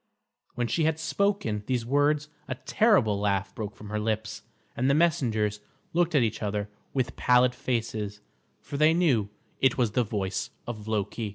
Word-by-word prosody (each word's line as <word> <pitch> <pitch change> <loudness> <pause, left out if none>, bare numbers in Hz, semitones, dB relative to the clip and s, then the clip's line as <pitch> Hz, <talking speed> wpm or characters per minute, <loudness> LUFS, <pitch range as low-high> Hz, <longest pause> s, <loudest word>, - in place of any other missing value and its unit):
When 120 - 0
she 155 +7 +1
had 160 0 +1
spoken 160 - 0
these 125 -3 0
words 145 +3 +2 0.2
a 130 - -3
terrible 130 - +3
laugh 100 -1 0
broke 105 -2 -5
from 105 - -10
her 105 - -1
lips, 110 0 -2 0.3
and 130 +3 +1
the 140 - +4
messengers 115 -11 +1 0.3
looked 175 -1 +2
at 135 - +5
each 110 -1 -1
other 105 -1 -2 0.2
with 125 -3 -1
pallid 125 0 +4
faces, 110 -5 -3 0.4
for 140 - -6
they 155 +2 +5
knew 130 - +2 0.3
it 130 -2 +3
was 120 -4 +2
the 125 +3 +2
voice 100 -4 -2 0.2
of 110 -3 -6
Loki. 110 +1 -2
120 Hz, 170 wpm, -27 LUFS, 105-140 Hz, 0.4 s, at